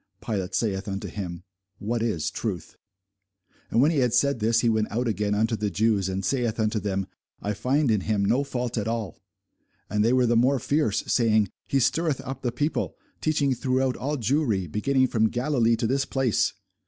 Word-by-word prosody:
Pilate 95 -4 -3
saith 100 -3 -1
unto 95 -1 -4
him, 90 -4 -6 0.3
What 115 +3 -2
is 105 -10 -1
truth? - - -4 0.9
And 120 - +3
when 150 - +4
he 155 - +1
had 125 -2 +2
said 140 0 +2
this, 115 +1 +2
he 120 - +1
went 110 -1 +1
out 120 +3 -1
again 105 -2 0
unto 110 +2 +1
the 105 -1 -1
Jews, 100 0 +1
and 95 0 -3
saith 120 0 0
unto 110 0 +1
them, 95 -1 -2 0.3
I 105 - -2
find 130 +5 +1
in 105 -3 +2
him 105 0 0
no 120 +7 +2
fault 125 -3 -3
at 105 - -3
all. 115 -3 -3 0.7
And 105 0 +2
they 115 - +3
were 125 -1 +4
the 120 0 +2
more 130 +4 +4
fierce, 140 -3 0
saying, 110 -4 +2 0.2
He 135 - +2
stirreth 155 +2 +1
up 135 0 -6
the 120 - -1
people, 145 +6 -2 0.3
teaching 145 -3 +1
throughout 130 +1 0
all 145 +3 -2
Jewry, 120 - +1
beginning 130 - +1
from 110 -3 +2
Galilee 120 -2 +1
to 115 - -2
this 135 +4 +1
place. 130 -6 +1
115 Hz, 190 wpm, -26 LUFS, 105-130 Hz, 0.9 s, when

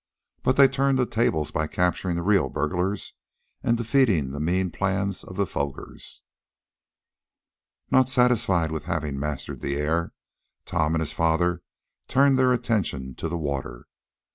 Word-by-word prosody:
But 130 - +2
they 140 -1 +8
turned 135 0 +1
the 125 - +2
tables 95 -11 0
by 80 - -1
capturing 90 +1 0
the 85 - -2
real 100 0 +3
burglars, 90 +6 -2 0.5
and 115 - +1
defeating 115 - +2
the 70 - -5
mean 90 +3 0
plans 100 +1 -1
of 95 - -10
the 100 +1 +1
Fogers. 70 -5 -5 1.7
Not 130 -1 +4
satisfied 110 -10 +3
with 80 - -4
having 75 -4 -2
mastered 75 -1 -4
the 70 - -2
air 80 +3 0 0.5
Tom 80 -1 0
and 80 - 0
his 75 - -3
father 85 +2 +1 0.5
turned 135 0 +4
their 130 -1 +4
attention 95 - -1
to 80 - -4
the 85 - -2
water. 70 -5 -4
Mr. - - -61
90 Hz, 150 wpm, -25 LUFS, 75-115 Hz, 1.7 s, they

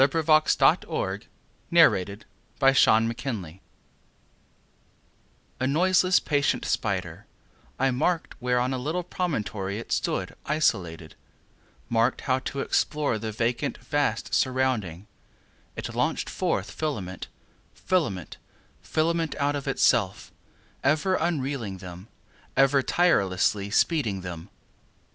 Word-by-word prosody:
Leaves 135 +2 +3
of 160 -1 +1
Grass. 155 -1 +4
1900. - - +1 0.4
208. 170 -6 +7
A 90 - -6
Noiseless 100 +2 -14 0.5
Patient 115 - 0 0.2
Spider 95 - -5 2.0
A 130 - +2
NOISELESS, 185 +5 +3
patient 145 -2 0
spider,I 135 0 -3
mark'd, 165 +7 0
where, 125 -1 +1
on 125 +2 0
a 130 - -2
little 160 +7 -2
promontory, 110 - -3
it 115 - -8
stood, - - -1
isolated; 90 - 0 0.7
Mark'd 115 +2 +1
how, 130 -1 +1
to 135 +1 -4
explore 145 -7 0
the 110 0 -4
vacant, 120 +6 -1
vast 145 -7 -1
surrounding, 125 -9 0 0.7
It - - -5
launch'd - - -1
forth - - -1
filament, 100 - -4 0.5
filament, 145 - -1 0.4
filament, 165 0 0
out 145 0 0
of 140 -1 -5
itself; 115 -7 +1 0.5
Ever 155 +7 +2
unreeling 140 - -2
them—ever 100 +9 -2
tirelessly 100 - +2
speeding 110 - +1
them. 85 -2 -7
130 Hz, 105 wpm, -26 LUFS, 100-155 Hz, 2.0 s, 208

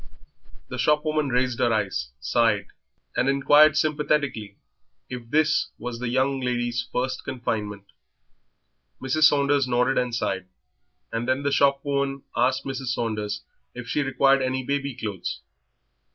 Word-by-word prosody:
The 130 - -5
shopwoman 150 +2 +1
raised 125 -1 0
her 120 - +3
eyes, 100 -12 -1
sighed, 105 - +1 0.5
and 130 - +2
inquired 145 +2 +5
sympathetically 150 -9 0 0.5
if 120 -2 -7
this 155 +3 +2
was 120 0 -6
the 125 -1 -2
young 135 +2 +1
lady's 120 -1 -1
first 130 +1 -2
confinement. 105 -5 -3 1.2
Mrs. 150 +4 +2
Saunders 140 -2 +3
nodded 125 +2 +2
and 125 -2 -1
sighed, 95 -5 -2 0.6
and 115 +2 -3
then 130 +2 +1
the 140 - 0
shopwoman 140 0 +1
asked 130 +3 +1
Mrs. 135 -1 -4
Saunders 105 -3 -2 0.3
if 125 -1 -7
she 150 - 0
required 135 0 +3
any 130 0 -1
baby 140 0 -2
clothes. 105 -6 -5
130 Hz, 130 wpm, -25 LUFS, 120-140 Hz, 1.2 s, inquired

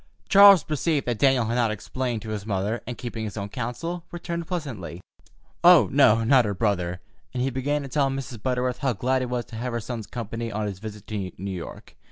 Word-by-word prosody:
Charles 200 -4 +8
perceived 155 -1 -1
that 120 -3 -2
Daniel 130 -3 +4
had 115 - -1
not 120 -2 +2
explained 115 +2 -3
to 110 - -7
his 105 -2 -4
mother, 105 +2 -2
and, 125 - -5
keeping 115 -2 -5
his 105 -1 -5
own 100 0 -4
counsel, 150 - -4
returned 170 -1 -5
pleasantly: 115 - -5 0.6
"Oh, - - +7
no, 115 +2 +5
not 130 +2 +5
her 100 -1 -2
brother," 90 -4 -1 0.3
and 125 - 0
he 135 - 0
began 140 +3 -1
to - - -6
tell 135 +1 +1
Mrs. 135 -4 -5
Butterworth 125 +1 -1
how 135 -4 +1
glad 130 +5 0
he 130 - -2
was 125 -1 -2
to 115 - -9
have 125 +1 -3
her 120 - -1
son's 115 -2 -6
company 115 0 -5
on 105 +1 -2
his 100 -3 -5
visit 105 -1 -8
to 100 -4 -4
New 100 +2 -5
York. 90 -3 -8
120 Hz, 220 wpm, -25 LUFS, 105-135 Hz, 0.6 s, Charles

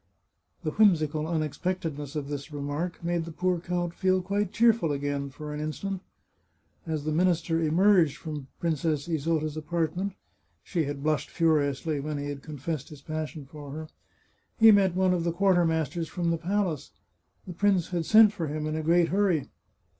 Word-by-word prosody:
The 155 - -1
whimsical 155 -6 +3
unexpectedness 155 -2 -3
of 145 -2 -3
this 145 +1 -5
remark 145 +5 -4
made 170 0 0
the 165 - -7
poor 180 +2 0
count 175 0 -2
feel 185 0 +2
quite 200 +1 -1
cheerful 225 -7 +3
again, 140 0 -2
for 150 +2 -7
an 150 - -4
instant. 185 +5 -4 0.9
As 155 -2 -2
the 155 - -1
minister 165 0 +2
emerged 165 -1 +4
from 150 -5 -6
Princess 160 -2 -1
Isota's 155 -1 -1
apartment 170 +4 -2 0.5
(she 165 - -1
had 140 0 -5
blushed 155 -1 0
furiously 155 -2 +1
when 150 +1 -3
he 145 0 -4
had 140 -1 -5
confessed 150 -1 -5
his 145 -3 -12
passion 155 -2 -5
for 145 +1 -10
her), 155 +1 -7 0.7
he 225 -1 +8
met 195 -3 +4
one 185 0 +3
of 175 -2 0
the 170 - 0
quartermasters 170 -3 +1
from 170 -2 -1
the 165 - +1
palace. 180 -3 -1 0.6
The 180 - -7
prince 195 -1 +2
had 175 -3 -2
sent 215 -1 +7
for 170 -6 -3
him 150 +1 -3
in 155 0 -2
a 160 - -1
great 170 +2 +3
hurry. 185 -7 +1
160 Hz, 170 wpm, -27 LUFS, 150-180 Hz, 0.9 s, he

